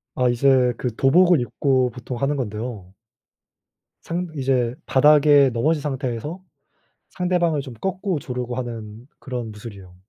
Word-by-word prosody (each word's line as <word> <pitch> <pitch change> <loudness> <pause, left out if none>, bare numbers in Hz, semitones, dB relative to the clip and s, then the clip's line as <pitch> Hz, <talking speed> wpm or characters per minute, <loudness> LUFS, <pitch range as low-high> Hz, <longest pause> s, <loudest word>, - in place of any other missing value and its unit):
아, 125 -1 +2
이제 125 0 +3
그 120 -3 -3
도복을 175 +6 +4
입고 130 0 +1
보통 125 0 -7
하는 140 +3 0
건데요 105 -5 -5 1.1
상 175 +2 -3
이제 130 -3 0
바닥에 145 0 +5
넘어진 150 +6 +1
상태에서 140 - -4 0.7
상대방을 175 -4 0
좀 130 -3 -9
꺾고 190 - -2
조르고 125 -2 -5
하는 115 -2 -7
그런 125 -4 -5
무술이에요. 100 -4 -11
130 Hz, 285 characters per minute, -22 LUFS, 120-150 Hz, 1.1 s, 바닥에